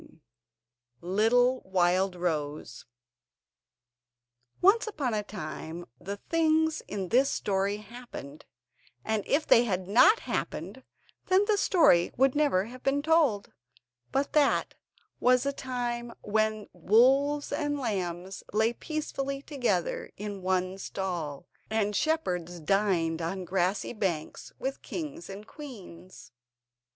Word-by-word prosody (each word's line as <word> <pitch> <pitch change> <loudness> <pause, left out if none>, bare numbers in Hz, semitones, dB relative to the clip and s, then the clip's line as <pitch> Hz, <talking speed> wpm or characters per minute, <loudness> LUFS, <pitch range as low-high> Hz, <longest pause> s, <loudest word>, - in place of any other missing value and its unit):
] 120 +1 -50 0.2
Little 245 +3 +4
Wildrose 175 -7 -1 1.7
Once 410 +5 +4
upon 285 - -2
a 210 - 0
time 170 -3 -7
the 200 +3 -5
things 320 +3 +1
in 190 -3 -4
this 265 +4 +4
story 200 0 0
happened, 210 - -10 0.6
and 220 -2 0
if 300 +2 +2
they 235 - +6
had 185 -4 -2
not 250 - +6
happened 200 +11 -4 0.4
then 380 +2 +4
the 425 0 +3
story 330 - +4
would 265 +1 +4
never 285 -11 +2
have 250 +3 -11
been 280 +1 +1
told. 305 -11 +2 0.6
But 275 +1 0
that 295 -2 +3 0.5
was 250 0 +4
the 280 0 -1
time 240 -3 -4
when 215 0 0
wolves 265 - +3
and 290 -1 -1
lambs 190 -6 -3
lay 220 +2 +2
peacefully 275 -1 -4
together 240 - -1
in 205 -1 -6
one 185 +1 -1
stall, 175 -7 -4 0.2
and 210 -1 0
shepherds 180 - -1
dined 170 -2 +1
on 180 +3 -3
grassy 185 +4 0
banks 180 -8 -3
with 270 +1 -4
kings 315 - -6
and 200 +2 -8
queens. 190 - -11
210 Hz, 115 wpm, -29 LUFS, 185-275 Hz, 1.7 s, they